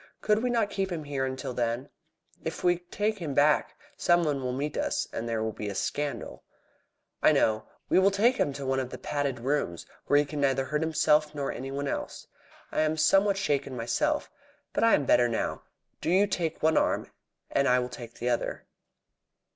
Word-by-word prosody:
Could 210 0 +2
we 250 - 0
not 230 -4 +1
keep 195 -1 -2
him 165 -3 -3
here 140 -2 -2
until 130 -1 -4
then? 120 +2 -1 0.6
If - - -5
we 175 -1 +3
take 205 +4 -2
him 150 -6 -4
back, 150 +1 +3 0.2
some 175 0 +3
one 145 -4 0
will 125 -1 -2
meet 145 +3 -3
us, - - -1
and 115 +1 -3
there 115 -1 -1
will 110 - -1
be 105 -1 -5
a 100 - -5
scandal." 145 +7 -3 0.8
"I - - +6
know. 110 0 +2 0.2
We - - +4
will 190 +1 +5
take 225 +6 +3
him 145 - +1
to 140 0 -6
one 135 0 +1
of 130 -2 -3
the 130 - -7
padded 140 0 -2
rooms, 130 - -1 0.2
where 145 - +5
he 145 - +4
can 145 0 -4
neither 135 -1 +2
hurt 150 +2 -1
himself 155 -1 +2
nor 140 -2 -2
anyone 135 +3 -4
else. - - -4 0.5
I - - +1
am 155 0 +1
somewhat 195 +5 +4
shaken 140 -8 -1
myself. 295 - 0 0.4
But - - +1
I 230 - +6
am 145 - -1
better 125 -1 +5
now. 115 -2 -2 0.4
Do - - -1
you 190 +4 +5
take 170 -6 -2
one 160 0 +4
arm, - - +1 0.4
and 140 0 +2
I 125 - +5
will 125 0 0
take 120 -2 -9
the 120 - -4
other." 120 - -2
145 Hz, 200 wpm, -28 LUFS, 130-175 Hz, 0.8 s, I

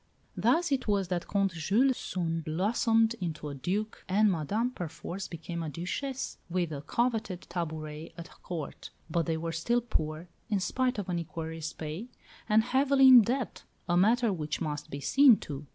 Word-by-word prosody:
Thus 340 -1 +2
it 270 -4 0
was 200 -3 +1
that 175 -2 -2
Comte 195 -2 +1
Jules 215 +11 +2
soon 165 -6 -2
blossomed 220 +7 +2
into 155 -4 -4
a - - -5
Duke, 195 +10 -3
and 205 +2 +4
Madame 205 - -1
perforce 180 0 -6
became 170 0 -6
a 160 - -3
Duchess, 245 - -4
with 175 -2 -1
a 140 -2 -4
coveted 220 0 -1
tabouret 155 -2 -5
at 170 +1 -11
Court. 165 -5 -6 0.2
But 170 0 0
they 165 -1 0
were 165 +1 -3
still 200 +10 +1
poor, 160 -8 -3 0.2
in 205 -2 +1
spite 255 +6 0
of 200 -2 -3
an 175 -2 -1
equerry's 160 -1 -5
pay, 160 +9 -6 0.4
and 215 +1 +5
heavily 270 +2 +5
in 250 -2 +11
debt, 245 +3 -2 0.2
a 175 - +2
matter 225 +4 +4
which 155 -3 -3
must 150 -2 -4
be 140 - -6
seen 270 - +6
to. 145 0 -7
180 Hz, 170 wpm, -30 LUFS, 160-225 Hz, 0.4 s, in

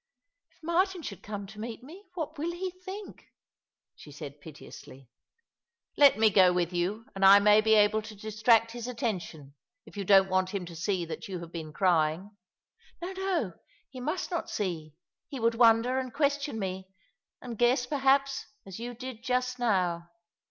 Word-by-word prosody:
" - - -55
If - - -34
Martin 355 +2 0
should 200 - -7
come 205 -1 -6
to 210 +2 -12
meet 230 +2 -7
me, 355 +10 -13
what 310 -3 -5
will 330 +3 -2
he 365 +2 -4
think? 375 +3 -10 0.7
she 150 - -14
said 145 -1 -9
piteously. 135 -3 -12 0.4
*' 470 - -61
Let 285 -5 +6
me 220 -1 +4
go 185 -2 +6
with 180 -1 -1
you, 190 +6 -2
and 195 - -4
I 195 +1 +9
may 210 +1 +5
be 220 0 +4
able 210 +1 +4
to 215 0 -10
distract 220 +2 +2
his 240 0 -6
attention 185 - -4 0.2
— - - -60
if - - -16
you 200 - -3
don't 195 0 +5
want 185 +1 0
him 190 -3 -3
to 170 -1 -10
see 175 +1 -1
that 165 - -7
you 190 -2 -5
have 170 -1 -9
been 160 -3 -7
crying." 175 +3 +1 0.7
"Xo, 375 +2 -5
no. 365 - -1 0.4
He 255 - -9
must 310 +9 -3
not 345 - -3
see. 165 -7 -4 0.3
He 275 - -6
would 230 0 +2
wonder, 230 +2 +4
and 255 -1 -5
question 285 -2 -1
me 190 -2 -4 0.3
— - - -62
and 245 -2 -6
guess, 245 +2 +2
perhaps— 275 0 +1 0.2
as 195 +1 -9
you 240 +1 -6
did 255 -1 -8
just 250 0 -1
now. 180 -7 0
220 Hz, 185 wpm, -29 LUFS, 185-265 Hz, 0.7 s, I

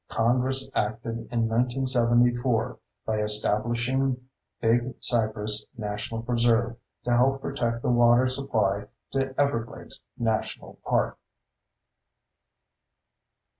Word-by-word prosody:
Congress 130 +3 +2
acted 115 +2 -2
in 115 -1 +1
1974 120 0 +1 0.3
by 110 -1 -1
establishing 120 +5 0 0.4
Big 120 +2 +1
Cypress 110 -2 +2
National 110 +1 -4
Preserve 120 0 +2 0.3
to 125 - -1
help 135 +3 +3
protect 120 -4 -2
the - - +1
water 120 +1 +5
supply 110 -7 -1 0.2
to 135 0 -2
Everglades 120 -5 -2 0.2
National 110 -1 -2
Park. - - 0
120 Hz, 90 wpm, -26 LUFS, 115-125 Hz, 0.4 s, water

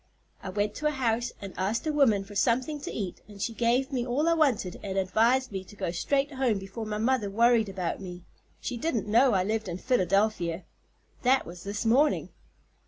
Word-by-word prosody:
I - - -6
went 205 +2 -1
to 300 - 0
a 300 -2 -1
house 235 -1 0
and 195 - -7
asked 205 - -1
a 310 - 0
woman 230 -9 +3
for 200 +1 -12
something 255 +8 +1
to - - -5
eat 195 -5 -5
and 205 -2 -13
she 230 - -2
gave 240 +4 +1
me 250 -3 0
all 260 +6 0
I 335 - +5
wanted 265 - +1
and 195 -1 -4
advised 230 +7 +2
me 190 -1 -4
to 205 - -14
go 190 -4 -2
straight 275 - 0
home 260 -5 +1
before 195 +3 -6
my 210 0 -2
mother 225 -1 +1
worried 230 +1 +3
about 190 -1 -3
me. 180 -2 -8 0.4
She 250 - -4
didn't 235 - -1
know 235 +4 +4
I 185 -2 +3
lived 220 +2 -1
in 175 - -3
Philadelphia. 190 -5 +1 0.6
That 260 +1 +3
was 175 +1 -9
this 205 +3 -4
morning." 275 +7 +3
220 Hz, 205 wpm, -28 LUFS, 195-255 Hz, 0.6 s, I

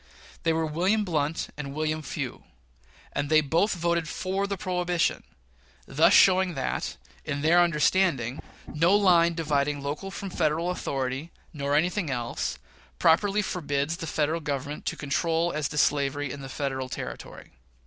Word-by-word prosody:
They 165 - +2
were 160 0 0
William 185 +8 +1
Blount 155 -3 -1
and 140 -1 -6
William 155 0 -1
Few; 145 - -5 0.7
and 145 - -2
they 155 0 +6
both 165 +8 +1
voted 170 -2 0
for 190 +2 -2
the 200 -1 -3
prohibition 180 -1 0 0.6
thus - - +4
showing 185 -2 +5
that, 135 - -3 0.3
in 145 -1 -3
their 170 +3 +5
understanding, 150 -6 +2 0.2
no 165 +6 +2
line 170 -4 +4
dividing 145 -3 0
local 145 +7 -4
from 195 0 -6
Federal 165 +2 0
authority, 135 -2 -3 0.2
nor 140 -1 -1
anything 175 +2 +1
else, 120 - -3 0.4
properly 200 +5 +3
forbade 145 -5 -2
the 165 -1 -4
Federal 155 +2 0
Government 145 0 -4
to - - -2
control 165 +4 0
as 150 -2 -1
to 150 - -6
slavery 145 -1 +1
in 140 0 -7
Federal 130 -1 -3
territory. - - -7
155 Hz, 145 wpm, -27 LUFS, 145-175 Hz, 0.7 s, they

